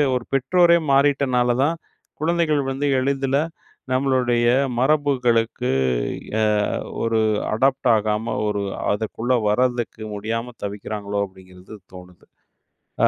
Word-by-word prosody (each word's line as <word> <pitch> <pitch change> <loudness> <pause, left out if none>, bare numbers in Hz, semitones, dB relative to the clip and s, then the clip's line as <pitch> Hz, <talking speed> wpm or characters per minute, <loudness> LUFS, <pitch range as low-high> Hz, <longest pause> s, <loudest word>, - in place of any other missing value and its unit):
ஒரு 125 - -2
பெற்றோரே 170 +6 +4
மாறிட்டனால 135 -3 +2
தான் 165 +4 0 0.4
குழந்தைகள் 160 -2 +1
வந்து 135 +2 -2
எளிதில 135 0 0 0.5
நம்மளுடைய 130 -3 +1 0.3
மரபுகளுக்கு 125 -4 +1 0.7
எ - - +2 0.6
ஒரு 115 -1 +1 0.3
அடாப்ட் 130 +4 +1
ஆகாம, 105 0 -1 0.2
ஒரு 105 -1 -1 0.3
அதுக்குள்ளே 110 +4 -1
வரதுக்கு 120 -1 0
முடியாம 115 +4 -4
தவிக்கிறாங்களோ, 100 0 -4
அப்படிங்கிறது 95 +1 -15 0.2
தோணுது. 90 -1 -14 0.8
ஆ. - - +7
125 Hz, 95 wpm, -22 LUFS, 105-135 Hz, 0.8 s, ஆ